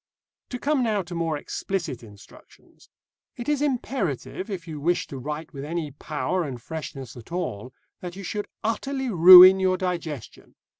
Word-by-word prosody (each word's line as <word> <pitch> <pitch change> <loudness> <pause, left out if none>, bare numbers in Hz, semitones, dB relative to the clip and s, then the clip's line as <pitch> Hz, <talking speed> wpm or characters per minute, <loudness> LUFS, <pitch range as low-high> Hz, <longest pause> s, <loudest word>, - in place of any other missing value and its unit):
To 250 - -4
come 285 +2 0
now 215 -5 0
to 175 +1 -10
more 165 -2 -1
explicit 160 -4 -4
instructions. 105 -3 -18 0.5
It 240 - -7
is 295 -1 0
imperative, 240 - -2
if 185 -4 -6
you 155 -2 -6
wish 170 +4 0
to 135 - -8
write 150 +4 -6
with 140 -1 -7
any 155 0 -4
power 150 +4 -3
and 135 -6 -6
freshness 135 -3 -8
at 120 +5 -13
all, 130 - -4 0.3
that 180 -1 -7
you 195 - -8
should 205 +2 -4 0.2
utterly 265 +4 -2
ruin 185 +1 +10
your 185 -1 +2
digestion. 170 - -5
175 Hz, 160 wpm, -25 LUFS, 145-195 Hz, 0.5 s, ruin